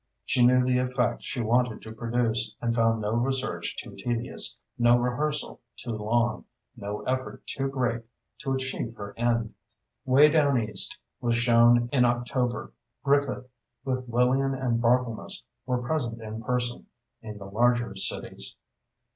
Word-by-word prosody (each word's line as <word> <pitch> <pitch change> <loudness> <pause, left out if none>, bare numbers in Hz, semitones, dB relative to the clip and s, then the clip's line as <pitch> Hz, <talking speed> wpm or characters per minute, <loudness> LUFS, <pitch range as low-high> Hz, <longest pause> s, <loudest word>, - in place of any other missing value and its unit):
She 125 - +3
knew 125 +1 +6
the 125 0 +3
effect 125 -1 0
she 125 - -3
wanted 120 0 +1
to 110 - -8
produce, 115 -1 -1
and 115 -1 0
found 115 -1 +2
no 105 0 -1
research 120 -8 -1
too - - -7
tedious, 120 0 -1 0.2
no 120 0 +6
rehearsal 135 +5 -1 0.2
too 120 - -6
long—no 110 -2 -2
effort 130 0 -3
too 135 0 -2
great, 125 -4 -1 0.4
to 135 - -2
achieve 130 -3 -3
her 100 -1 -7
end. 115 -1 0 0.5
"Way 135 +4 +6
Down 145 -4 +3
East" 105 -3 -3 0.2
was 120 -1 +1
shown 120 0 +5
in 130 -3 +5
October. 120 -1 0 0.3
Griffith, 140 -2 +1 0.4
with 130 -2 -2
Lillian 130 +3 +2
and 125 -3 0
Barthelmess, 120 -1 +1 0.2
were 125 -1 0
present 120 -4 -1
in 110 0 -6
person, 120 +1 -1 0.3
in 110 -2 -8
the 100 - -9
larger 120 +2 +1
cities. 95 - -5
120 Hz, 140 wpm, -27 LUFS, 115-125 Hz, 0.5 s, knew